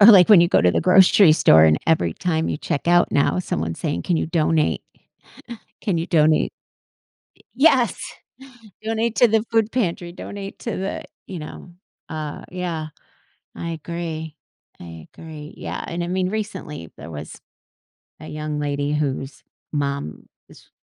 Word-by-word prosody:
Or 205 - +9
like 190 -4 +8
when 200 -5 +8
you 170 - +4
go - - +4
to 90 - +4
the - - +1
grocery 185 -1 +6
store 80 - +6
and 80 0 +4
every 90 - +2
time 160 - -1
you - - -1
check 145 0 -3
out 175 0 +4
now, 140 - +2
someone's 80 - -3
saying, 85 - -2
"Can 175 - 0
you - - -1
donate" 160 -1 +1 1.0
"Can 190 -7 0
you 165 - -2
donate" 155 -3 +3 0.8
Y - - -23
yes! 260 -4 +3 0.9
"Donate 225 +1 -1
to 245 - +6
the 220 0 +2
food 225 -1 +2
pantry. 175 -7 -2
Donate 200 +2 -8
to 230 - -4
the" 190 +1 -4 0.2
you 185 - -7
know, 160 +3 -10 0.4
uh, 155 -2 -5
yeah. 175 -4 -4 0.7
I 170 - -4
agree. 160 -1 -5 0.4
I 85 -2 -11
agree, 155 -2 -10
yeah, - - -5
and 170 +1 -3
I - - -4
mean, 185 +1 -1
recently 185 - -5
there 80 - -10
was 75 0 -9 0.8
a - - -9
young 150 -1 -4
lady 145 0 -2
whose 135 -2 -3 0.3
mom 140 - -3 0.2
is - - -18
165 Hz, 160 wpm, -22 LUFS, 150-185 Hz, 1.0 s, Or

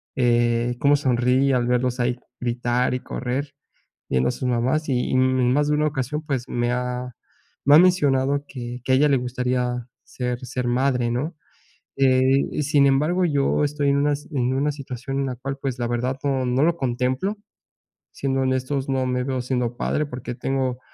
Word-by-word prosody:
eh, 120 -1 +2
cómo 145 +1 +4
sonríe 130 0 +2
al 120 -1 +1
verlos 125 0 0
ahí 120 0 0 0.2
gritar 120 +1 0
y 125 - -1
correr 130 +3 -4 0.6
viendo 65 -1 +1
a - - -2
sus 125 +1 -3
mamás. 130 +6 0
Y 125 -2 0
en 130 -1 +3
más 145 +1 +2
de 150 - +2
una 150 +1 +2
ocasión, 145 +1 -3
pues, 135 -5 -3
me 120 0 0
ha, 125 0 -3 0.5
me 145 +2 +6
ha - - +9
mencionado 145 -6 +3
que, 120 -1 -7
que 130 - +1
a - - +6
ella 150 +2 +4
le 135 -2 +3
gustaría 125 -1 -2 0.2
ser 125 -1 -4
ser 125 0 -3
madre, 125 -1 +1
¿no? 150 +7 -2 0.6
Eh, 135 +2 +3
sin 140 -1 +4
embargo, 155 +7 +2
yo 145 -1 +1
estoy 145 -1 0
en 140 - +3
unas 145 0 0
en 130 -2 0
una 145 +3 +1
situación 135 -1 -5
en 135 - 0
la 125 - -3
cual, 135 +2 -5
pues, 135 -2 -2
la 120 - -1
verdad 125 +2 -1
no 135 -2 0
no 125 +3 +1
lo 170 +1 +3
contemplo. 130 - -1 0.8
Siendo 135 -1 -1
honestos, 130 +1 -1
no 130 -1 0
me 125 0 -1
veo 130 -2 -2
siendo 125 -2 -2
padre, 150 +3 -1
porque 125 -2 -6
tengo 130 0 -2
130 Hz, 185 wpm, -23 LUFS, 125-140 Hz, 0.8 s, ha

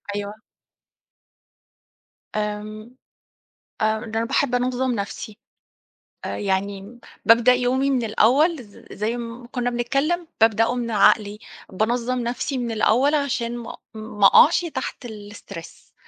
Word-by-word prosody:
أيوه. 205 0 -4 2.0
آمم 215 +2 -5 0.9
آآ، 220 0 +2
ده 220 0 -3
أنا 230 - 0
باحب 270 0 +1
أنظّم 255 +1 0
نَفْسي، 210 +1 -6 0.9
آآ - - -4
يعني 200 +3 -3 0.3
بابدأ 235 +2 +6
يومي 255 +2 +1
من 260 -3 +1
الأول 260 +8 +3
ز 205 -2 -17
زي 220 +4 -2
ما 235 0 -7
كنّا 245 -1 -1
بنتكلّم، 275 +8 -1
بابدأه 225 +2 +3
من 235 -2 -3
عقلي. 210 0 +3 0.3
بانظّم 240 +5 -1
نَفْسي 245 +3 -2
من 240 -2 -2
الأول 245 +7 +3
عشان 240 -5 -1
ما 235 - -7
أ - - -13 0.2
ما 210 -2 -1
أقعش 340 - +6
تحت 260 -5 -5
الstress 205 -6 -11
235 Hz, 125 wpm, -23 LUFS, 215-250 Hz, 2.0 s, بابدأ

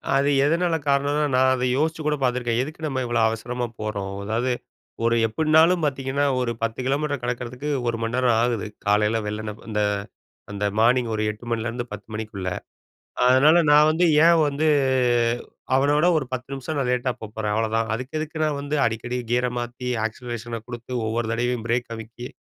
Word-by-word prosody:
அது 140 +1 +3 0.2
எதனால 170 +2 +2
காரணம்னா, 140 +2 +2
நான் 130 0 +4
அதை 125 0 0
யோசிச்சு 160 +2 0
கூட 150 - +2
பார்த்துருக்கேன், 120 -2 0
"எதுக்கு 155 +3 -9
நம்ம 130 -2 -2
இவ்வளோ 120 -1 0
அவசரமா 120 +2 -3
போறோம்?" 100 -2 -4
அதாவது 115 +5 -1 0.5
ஒரு 115 0 +3
எப்படினாலும் 160 +7 +3
பார்த்தீங்கன்னா 135 0 -1 0.2
ஒரு 120 -1 -1
10 115 +2 -2
கிலோமீட்டர் 145 +1 0
கடக்கிறதுக்கு 125 +3 -4 0.2
1 115 - 0
மணி 115 +1 -2
நேரம் 125 -3 +3
ஆகுது 120 -3 0 0.2
காலையில 105 +2 +3
வெள்ளண்ணை 105 0 -4
அந்த 105 -1 -1 0.7
அந்த 100 0 -3
மார்னிங் 120 +1 +3
ஒரு 110 - -1
8:00 105 +2 -9
மணிலேருந்து 115 +1 -2
10:00 105 0 -8
மணிக்குள்ள. 105 -4 -4 0.8
அதனால 145 +7 +6
நான் 150 +1 +7
வந்து 170 +3 +2 0.2
ஏன் 170 -1 +6
வந்து 145 +2 0 1.1
அவன 140 +2 +3
விட 170 +4 +4
ஒரு 145 - -1
10 130 +1 -5
நிமிஷம் 135 +3 -4
நான் 130 - 0
லேட்டா 125 0 0
போகப்போறேன் 105 -1 -3
அவ்ளோதான். 110 0 0
அதுக்கு 130 +6 -4
எதுக்கு 155 +1 -5
நான் 150 -2 0
வந்து 145 +1 -2
அடிக்கடி 115 +2 -2
கியரை 125 0 +1
மாத்தி 120 +1 -5 0.2
ஆக்சிலரேஷனை 120 0 -5
கொடுத்து 120 0 -8 0.2
ஒவ்வொரு 115 +1 -1
தடவையும் 120 0 -1
பிரேக் 120 0 0
அமுக்கி 115 +2 -8
125 Hz, 165 wpm, -23 LUFS, 115-140 Hz, 1.1 s, நான்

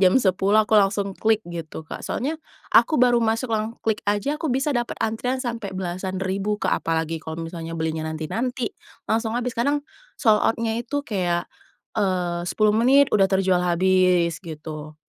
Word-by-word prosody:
jam 185 +2 +5
10:00, 200 -1 +3
aku 215 - -6
langsung 200 0 0
klik, 220 +2 +1
gitu, 165 -2 -7
Kak. - - -7
Soalnya 310 +5 -3 0.3
aku 310 - +5
baru 245 -1 +4
masuk 225 +2 0
lang 220 +1 -1
klik 220 -1 +1
aja, 240 +9 0
aku 320 - -1
bisa 270 +3 +1
dapet 240 -2 -2
antrian 225 +4 -1
sampai 235 -5 -4
belasan 185 +1 -3
ribu, 195 +2 -1
Kak. - - 0
Apalagi 165 0 -1
kalau 160 0 -6
misalnya 165 0 -6
belinya 160 -1 -2
nanti-nanti, 235 - -3 0.3
langsung 225 +1 0
habis. 245 0 -1
Kadang 285 +5 0 0.3
sold 220 -5 +4
out-nya 225 0 0
itu 285 +4 -3
kayak, 180 -7 -1 0.5
eee, 180 -5 0
10 215 +1 +2
menit, 260 +5 +4
udah 195 -2 +4
terjual 190 -2 +2
habis, 180 -1 +2
gitu. 155 -2 -8
205 Hz, 165 wpm, -23 LUFS, 175-235 Hz, 0.5 s, jam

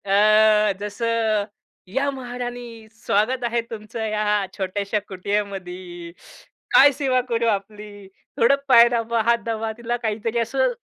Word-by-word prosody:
अ, 215 +1 +4
जसं 215 0 -1 0.4
"या 270 +9 -1
महाराणी, 245 -3 -7
स्वागत 230 +3 -1
आहे 235 0 0
तुमचं 220 0 -6
या 210 -1 0
छोट्याशा 200 +2 -2
कुटियामध्ये. 185 -3 -5 0.6
काय 285 +1 +8
सेवा 260 -2 0
करू 230 0 0
आपली?" 205 -1 -4 0.3
थोडं 235 +4 +4
पाय 235 -3 +8
दाबा, 230 -1 0
हात 235 0 +4
दाबा, 225 -1 -2
तिला 240 0 -3
काहीतरी 225 +1 -2
असं - - 0
220 Hz, 120 wpm, -22 LUFS, 205-235 Hz, 0.6 s, काय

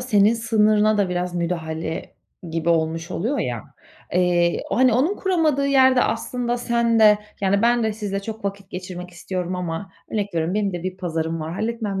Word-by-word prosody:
senin 220 -3 +4
sınırına 215 -2 +3
da 200 -2 +2
biraz 180 0 -2
müdahale 165 -2 -3 0.4
gibi 165 0 -2
olmuş 165 0 0
oluyor 245 +10 -1
ya. 120 - -2 0.5
Eee, 175 -1 +2
hani, 255 0 +4
onun 300 - +2
kuramadığı 315 -7 +1
yerde 260 -2 +5
aslında 245 -1 -1
sen 235 -1 +1
de, 210 -1 +7 0.2
yani, 200 +1 +2
ben 240 0 +3
de 220 -1 +1
sizle 205 -2 -3
çok 220 0 -7
vakit 200 0 -4
geçirmek 180 -1 -7
istiyorum 180 0 -4
ama 180 +2 -4 0.2
örnek 205 -4 -2
veriyorum, 165 +3 0
benim 205 -2 0
de 175 -1 -5
bir 185 0 -4
pazarım 165 -3 -2
var, 155 +1 -4
halletmem 215 -2 -2
200 Hz, 170 wpm, -22 LUFS, 175-230 Hz, 0.5 s, de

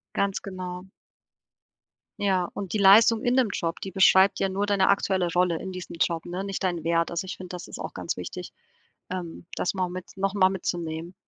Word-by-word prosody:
Ganz 200 -1 0
genau. 185 -2 -6 1.3
Ja, 185 -3 +1
und 195 -3 -5
die - - +1
Leistung 215 +3 +6
in 245 -1 +2
dem 255 -4 +3
Job, 165 0 -3
die 195 - -5
beschreibt 190 +1 +5
ja 195 - +1
nur 200 +2 -1
deine 200 -2 +3
aktuelle 190 -2 +2
Rolle 180 -2 +2
in 190 - -6
diesem 185 -2 -7
Job, 165 0 0
ne, 180 +2 -4
nicht 195 -1 -4
deinen 175 -4 -1
Wert. 165 0 +1
Also 170 +2 -2
ich 190 - -6
finde, 185 - -9
das 180 -1 -7
ist - - -8
auch - - -6
ganz - - -3
wichtig, - - -7 0.6
ähm, 175 -2 -6
das - - -1
mal 185 -1 -1
mit 180 0 -6
noch 195 0 0
mal 190 -2 +4
mitzunehmen. 170 -2 -4
185 Hz, 200 wpm, -26 LUFS, 175-195 Hz, 1.3 s, Leistung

